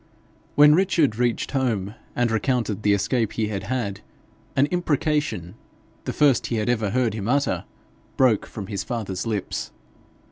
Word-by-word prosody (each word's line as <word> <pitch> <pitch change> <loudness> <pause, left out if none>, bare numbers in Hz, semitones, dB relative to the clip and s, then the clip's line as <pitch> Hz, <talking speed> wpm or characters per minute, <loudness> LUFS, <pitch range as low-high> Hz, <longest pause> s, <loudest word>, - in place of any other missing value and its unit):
When 150 0 +8
Richard 165 - +2
reached 120 -1 0
home 115 -8 -1 0.2
and 120 -1 +1
recounted 110 -2 0
the 105 -1 +3
escape 115 +2 0
he 110 -2 -1
had 100 -3 -4
had, 110 -6 -2 0.5
an 135 - +4
imprecation, 150 - 0 0.5
the - - -1
first 140 -5 +3
he 120 - -2
had 110 +1 0
ever 110 -4 +1
heard 120 -1 +1
him 105 -2 -4
utter, 140 +2 +1 0.5
broke 125 -6 +3
from 100 - -7
his 100 0 -4
father's 110 -4 -4
lips. 105 -4 -3
115 Hz, 150 wpm, -24 LUFS, 105-135 Hz, 0.5 s, When